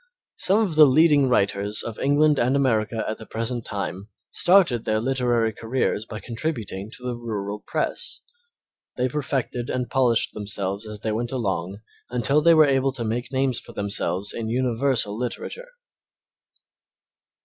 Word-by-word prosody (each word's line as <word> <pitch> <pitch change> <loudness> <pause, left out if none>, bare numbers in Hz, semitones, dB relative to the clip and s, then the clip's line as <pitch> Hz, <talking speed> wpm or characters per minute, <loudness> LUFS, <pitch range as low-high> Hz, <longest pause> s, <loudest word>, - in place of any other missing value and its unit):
Some 195 +2 +3
of 195 -7 0
the 155 -1 +8
leading 145 -1 +4
writers 100 -2 +1
of 115 -2 -6
England 145 +1 +3
and 125 +3 +2
America 115 -5 +1
at 110 - -4
the 110 - -11
present 115 +1 -3
time 100 -1 -5 0.2
started 175 - +4
their 110 0 0
literary 120 -2 +1
careers 115 -2 -2
by 110 - -6
contributing 115 -6 -4
to 125 - -14
the 125 - -2
rural 105 -3 -4
press. - - -2 0.8
They 125 0 +1
perfected 130 -3 -3
and 125 -2 -2
polished 125 -4 +2
themselves 100 0 -3
as 105 -1 -6
they 110 - -1
went 115 +2 -2
along 100 -5 -3 0.3
until 125 +5 +2
they 165 +1 +6
were 155 -1 +7
able 135 -1 +1
to 125 -2 -4
make 120 +4 -3
names 130 -2 +1
for - - -13
themselves 100 -1 -2
in 110 -1 -4
universal 125 -2 0
literature. 125 - -5
120 Hz, 150 wpm, -24 LUFS, 110-135 Hz, 0.8 s, the